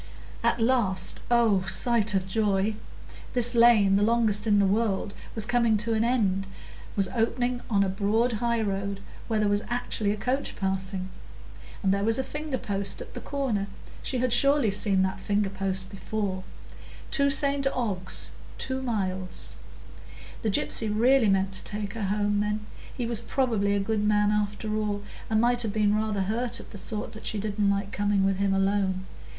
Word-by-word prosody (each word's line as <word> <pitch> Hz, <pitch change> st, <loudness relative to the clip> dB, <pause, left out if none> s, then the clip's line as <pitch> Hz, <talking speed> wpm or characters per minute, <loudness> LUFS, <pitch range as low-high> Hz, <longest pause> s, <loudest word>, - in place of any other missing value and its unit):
At -, -, +1 dB
last—oh, 225 Hz, -2 st, +2 dB
sight 215 Hz, +1 st, +1 dB
of 190 Hz, -1 st, 0 dB
joy!—this 215 Hz, +4 st, -1 dB
lane, 225 Hz, -5 st, +5 dB
the -, -, +1 dB
longest 220 Hz, -1 st, +2 dB
in 205 Hz, -1 st, +4 dB
the 200 Hz, -, +4 dB
world, 200 Hz, 0 st, 0 dB, 0.2 s
was 220 Hz, -2 st, 0 dB
coming 235 Hz, -2 st, +2 dB
to 220 Hz, +2 st, 0 dB
an 220 Hz, 0 st, +2 dB
end, 200 Hz, -6 st, +1 dB, 0.5 s
was 195 Hz, -2 st, +2 dB
opening 245 Hz, +1 st, 0 dB
on 200 Hz, -3 st, +3 dB
a -, -, +1 dB
broad 210 Hz, +5 st, +1 dB
highroad, 200 Hz, -4 st, -1 dB, 0.3 s
where 220 Hz, -2 st, 0 dB
there 210 Hz, -, +2 dB
was 205 Hz, 0 st, +2 dB
actually 240 Hz, -3 st, -1 dB
a 210 Hz, -, 0 dB
coach 255 Hz, +6 st, -1 dB
passing! 190 Hz, -1 st, -2 dB, 0.7 s
And 190 Hz, -1 st, +3 dB
there 200 Hz, 0 st, 0 dB
was 225 Hz, +1 st, +3 dB
a 265 Hz, -, 0 dB
finger 295 Hz, -1 st, -4 dB
post 200 Hz, -5 st, 0 dB
at -, -, -9 dB
the -, -, -6 dB
corner,—she 255 Hz, -2 st, -4 dB
had 250 Hz, -1 st, +1 dB
surely 275 Hz, -2 st, +4 dB
seen 195 Hz, -1 st, +2 dB
that 190 Hz, +1 st, -2 dB
finger 200 Hz, 0 st, 0 dB
post 190 Hz, -1 st, -2 dB
before,—"To 205 Hz, +7 st, -4 dB
St 280 Hz, 0 st, +1 dB
Ogg's, 200 Hz, -8 st, -1 dB, 0.3 s
2 265 Hz, 0 st, -2 dB
miles." 190 Hz, -7 st, -3 dB, 0.9 s
The 220 Hz, -, 0 dB
gypsy 215 Hz, +2 st, +2 dB
really 235 Hz, +1 st, +4 dB
meant 195 Hz, 0 st, +2 dB
to 190 Hz, -, -6 dB
take 205 Hz, -1 st, -5 dB
her 220 Hz, -3 st, -3 dB
home, 205 Hz, +1 st, +1 dB
then; 210 Hz, +1 st, -1 dB, 0.3 s
he 245 Hz, -, -1 dB
was 230 Hz, -1 st, -1 dB
probably 225 Hz, -6 st, 0 dB
a -, -, +1 dB
good 210 Hz, +1 st, -1 dB
man, 210 Hz, 0 st, +3 dB
after 210 Hz, +1 st, -1 dB
all, 205 Hz, -1 st, -2 dB, 0.3 s
and 220 Hz, -1 st, +2 dB
might 240 Hz, +1 st, +3 dB
have 220 Hz, -3 st, -1 dB
been 210 Hz, -1 st, +2 dB
rather 215 Hz, -2 st, 0 dB
hurt 225 Hz, +5 st, -1 dB
at -, -, -12 dB
the 205 Hz, -, -9 dB
thought 210 Hz, +2 st, -5 dB
that 220 Hz, -, -8 dB
she 215 Hz, -, -1 dB
didn't 205 Hz, 0 st, 0 dB
like 200 Hz, 0 st, -1 dB
coming 205 Hz, -1 st, +1 dB
with 195 Hz, -1 st, +1 dB
him 200 Hz, 0 st, +1 dB
alone. 195 Hz, -1 st, 0 dB
210 Hz, 170 wpm, -27 LUFS, 195-235 Hz, 0.9 s, lane